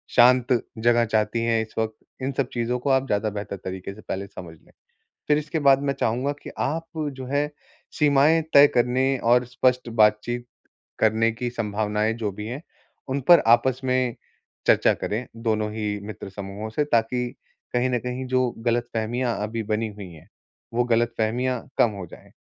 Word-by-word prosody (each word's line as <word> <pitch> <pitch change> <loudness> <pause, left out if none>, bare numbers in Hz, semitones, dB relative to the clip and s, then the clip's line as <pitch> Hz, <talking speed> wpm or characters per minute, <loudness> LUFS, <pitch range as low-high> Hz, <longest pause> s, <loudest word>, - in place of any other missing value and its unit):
शांत 125 0 +6 0.3
जगह 120 +1 +3
चाहती 110 +1 0
हैं 115 -1 +2
इस 110 - -7
वक़्त, 110 -1 -1 0.3
इन 130 +1 -1
सब 140 - +1
चीज़ 120 0 -2
को 125 +3 -2
आप 135 0 +2
ज़्यादा 105 0 0
बेहतर 100 -1 -5
तरीके 95 +1 -5
से 110 - -13
पहले 100 -1 -5
समझ 90 -4 -10
लें। - - -25 0.6
फिर 150 0 +4
इसके 155 +2 -3
बाद 140 -2 +4
मैं 140 -1 0
चाहूँगा 125 +5 0
कि - - -8
आप 165 +4 -1 0.3
जो 130 -1 -8
है, 145 +3 +1 0.5
सीमाएँ 150 +2 +4
तय 140 +1 +10
करने 130 +3 +2
और 120 +1 +3
स्पष्ट 125 0 0
बातचीत 115 +2 +2 0.5
करने 110 +1 +3
की 120 +2 -4
संभावनाएँ 105 -1 -1
जो 110 -3 -3
भी 105 +2 -7
हैं, 125 +5 -5 0.5
उन 135 +1 -1
पर 175 -1 +8
आपस 120 +3 +4
में 130 -2 +1 0.5
चर्चा - - +5
करें, 115 +4 -3
दोनों 110 -2 -1
ही 105 -2 -2
मित्र 105 -2 -7
समूहों 100 +2 -6
से 110 +7 0
ताकि 125 -1 +1 0.5
कहीं 125 +1 +2
न 125 - +1
कहीं 125 +2 -4
जो 130 -1 +2 0.2
गलतफहमियाँ 120 0 -1
अभी 110 +1 -3
बनी 110 +1 -1
हुई 100 -2 -9
हैं, 80 +2 -15 0.5
वो 120 +1 +2
गलतफहमियाँ 120 +1 0 0.2
कम 115 - +4
हो 95 - -5
जाए। - - -14
120 Hz, 175 wpm, -24 LUFS, 110-130 Hz, 0.6 s, तय